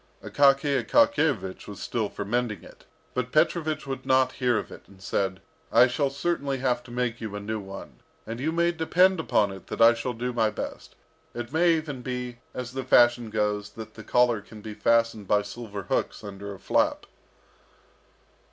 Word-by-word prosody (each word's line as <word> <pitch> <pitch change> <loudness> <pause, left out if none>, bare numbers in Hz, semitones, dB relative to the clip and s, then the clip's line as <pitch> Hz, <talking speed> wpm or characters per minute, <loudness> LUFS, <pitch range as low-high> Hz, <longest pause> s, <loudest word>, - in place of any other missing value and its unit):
Akaky 140 0 +3
Akakiyevich 160 - +2
was 100 -2 -8
still 110 -4 -2
for 100 - -6
mending 110 -3 -1
it, - - -16 0.3
but 125 -1 -2
Petrovich 155 0 +1
would 135 -1 -5
not 130 0 +3
hear 125 -3 +1
of - - -4
it, - - -10
and 100 -1 -18
said, 95 0 -2 0.3
"I 120 +2 +7
shall 135 +3 0
certainly 140 -1 -1
have 130 -1 0
to - - -13
make 120 -1 -2
you 110 -2 -5
a - - -3
new 110 +2 -3
one, 95 -1 -10 0.3
and 115 +2 -6
you 150 +5 0
may 170 +1 +2
depend 180 +3 +3
upon 105 -10 +2
it 95 -1 -11
that - - -6
I 115 +1 +8
shall 120 +2 -3
do 125 +2 -3
my 110 -2 +2
best. 105 - -7 0.4
It 120 +3 -6
may 170 +1 +4
even 150 -5 -4
be, 125 -1 -5
as 125 -1 -6
the 130 0 -4
fashion 120 -2 +4
goes, 105 -1 -1
that 110 -1 -9
the 110 - -10
collar 120 -3 +3
can 105 +1 -13
be 110 0 -7
fastened 115 -2 +1
by 105 +1 +3
silver 105 -1 -7
hooks 90 - -2
under 100 0 -7
a 100 - -8
flap." - - +1
120 Hz, 190 wpm, -26 LUFS, 105-135 Hz, 0.4 s, I